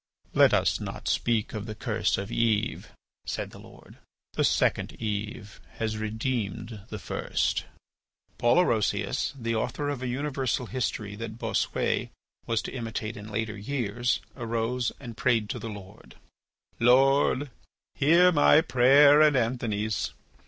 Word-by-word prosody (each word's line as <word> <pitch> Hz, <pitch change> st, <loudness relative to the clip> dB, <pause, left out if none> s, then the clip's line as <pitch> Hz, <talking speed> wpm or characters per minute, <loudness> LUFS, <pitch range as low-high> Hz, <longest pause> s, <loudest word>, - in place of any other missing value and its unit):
"Let -, -, +6 dB
us -, -, +2 dB
not -, -, -6 dB
speak 115 Hz, -3 st, 0 dB
of 105 Hz, 0 st, -5 dB
the 110 Hz, -, -6 dB
curse 110 Hz, -3 st, 0 dB
of 100 Hz, +1 st, -5 dB
Eve," 115 Hz, -1 st, 0 dB, 0.4 s
said -, -, -4 dB
the -, -, -12 dB
Lord. -, -, -16 dB, 0.3 s
"The -, -, 0 dB
second -, -, +1 dB
Eve 105 Hz, -1 st, -5 dB
has 110 Hz, -1 st, -2 dB
redeemed 110 Hz, -1 st, -3 dB
the 110 Hz, -, -5 dB
first." 90 Hz, -, -2 dB, 0.7 s
Paul 120 Hz, +4 st, +4 dB
Orosius, 110 Hz, -, +1 dB
the 115 Hz, -1 st, -2 dB
author 145 Hz, +6 st, -2 dB
of 140 Hz, -3 st, -3 dB
a 130 Hz, -, -3 dB
universal 130 Hz, -1 st, -1 dB
history 110 Hz, -4 st, -3 dB
that 110 Hz, 0 st, -6 dB
Bossuet -, -, -1 dB, 0.4 s
was 115 Hz, -1 st, 0 dB
to -, -, -6 dB
imitate 115 Hz, -3 st, -4 dB
in 105 Hz, +1 st, -9 dB
later 110 Hz, 0 st, -3 dB
years, 120 Hz, 0 st, -1 dB
arose 115 Hz, 0 st, -1 dB
and 120 Hz, -4 st, -9 dB
prayed 115 Hz, -3 st, +1 dB
to -, -, -5 dB
the 115 Hz, -, -6 dB
Lord: 100 Hz, -1 st, -11 dB, 0.6 s
"Lord, 135 Hz, +3 st, +4 dB, 0.4 s
hear 170 Hz, +5 st, +5 dB
my 150 Hz, -1 st, +6 dB
prayer 140 Hz, +1 st, +6 dB
and 150 Hz, -3 st, +5 dB
Anthony's. 110 Hz, -7 st, -1 dB
115 Hz, 140 wpm, -27 LUFS, 105-130 Hz, 0.7 s, Let